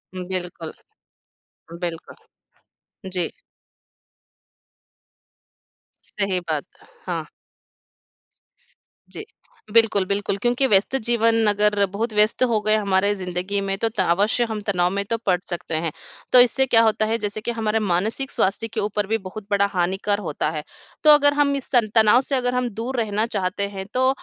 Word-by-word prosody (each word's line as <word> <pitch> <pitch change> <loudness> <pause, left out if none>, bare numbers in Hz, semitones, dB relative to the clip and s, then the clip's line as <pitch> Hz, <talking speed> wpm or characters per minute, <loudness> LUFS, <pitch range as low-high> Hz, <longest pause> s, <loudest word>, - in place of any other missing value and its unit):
हुँ, 180 -1 -5
बिल्कुल। 180 -3 -5 1.1
बिल्कुल। 170 -2 -5 1.0
जी। 180 -2 0 2.9
सही 195 -2 +1
बात। 150 -2 -2 0.4
हाँ। - - -3 1.8
जी। 420 - -8 0.5
बिल्कुल, 220 -3 +4
बिल्कुल 200 0 -2
क्योंकि 245 +3 +2
व्यस्त 205 +3 +3
जीवन 230 -1 +3
अगर 210 0 +3
बहुत 225 +2 -2
व्यस्त 210 +4 +3
हो 235 -4 +2
गए 215 0 +2
हमारे 200 -1 +1
ज़िंदगी 185 +1 -3
में 195 0 -2
तो 225 - 0
त - - -3
अवश्य 200 +7 +1
हम 215 -1 -4
तनाव 180 -3 +1
में 200 +1 -1
तो 230 - 0
पड़ 185 -2 +3
सकते 175 -2 -4
हैं। 160 0 -2 0.4
तो 250 - +9
इससे 250 +2 +5
क्या 235 -3 +5
होता 220 -1 +2
है 225 +1 0
जैसे 210 -1 -4
कि 235 - -2
हमारे 225 -1 -1
मानसिक 215 +7 -1
स्वास्थ्य 210 +4 0
के 225 - -2
ऊपर 210 -1 -2
भी 225 +2 +1
बहुत 195 +1 -9
बड़ा 200 0 +3
हानिकर 190 +3 0
होता 155 -5 -3
है। 155 -1 -5 0.4
तो 305 - +6
अगर 290 -1 +6
हम 290 -1 +2
इस 275 - -6
सं 240 -4 +3
तनाव 220 +2 +6
से 275 +1 -2
अगर 250 -1 -1
हम 250 -1 0
दूर 235 +5 -4
रहना 215 -1 0
चाहते 200 -2 -2
हैं 195 -1 -7
तो 260 +1 +2
210 Hz, 155 wpm, -22 LUFS, 190-230 Hz, 2.9 s, तो